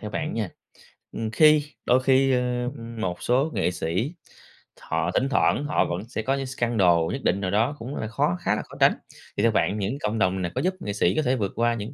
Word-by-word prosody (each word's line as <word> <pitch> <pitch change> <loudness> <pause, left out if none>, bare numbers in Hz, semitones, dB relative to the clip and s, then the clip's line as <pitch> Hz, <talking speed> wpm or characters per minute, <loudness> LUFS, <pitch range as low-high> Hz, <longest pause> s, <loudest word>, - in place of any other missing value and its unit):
theo 105 - -6
bạn 155 +7 -3
nha, 110 -5 -2 0.6
ừm, 110 -1 -4
khi 150 +4 +5 0.2
đôi 125 +1 +3
khi, 135 0 +4
ơ, 125 -1 0
ừm, 115 -1 -8
một 90 -4 -3
số 135 +6 +2
nghệ - - 0
sĩ, 90 - -2 0.7
họ 80 +2 -1
thỉnh 130 +7 +1
thoảng 140 +1 +2
họ 150 - +1
vẫn 85 +3 -3
sẽ 110 - -3
có 130 +5 0
những 135 -1 -3
scandal 120 -7 +1 0.2
nhất 135 - -4
định 100 - +1
nào 95 -2 -1
đó 115 +8 +1
cũng 130 +5 -6
là 110 - -3
khó 105 -5 0
khá - - +1
là - - -2
khó - - -14
tránh, - - +6 0.4
thì 100 - +1
theo 115 - +4
bạn 105 -1 +1
những 105 +7 -2
cộng 110 -1 -1
đồng 95 -2 +1
này 90 -1 -2
có - - 0
giúp 185 +2 +1
nghệ 105 - -4
sĩ 95 -3 +1
có - - +2
thể 130 -3 +1
vượt 100 -6 -2
qua 120 0 +2
những 115 +3 -6
115 Hz, 245 wpm, -25 LUFS, 100-130 Hz, 0.7 s, tránh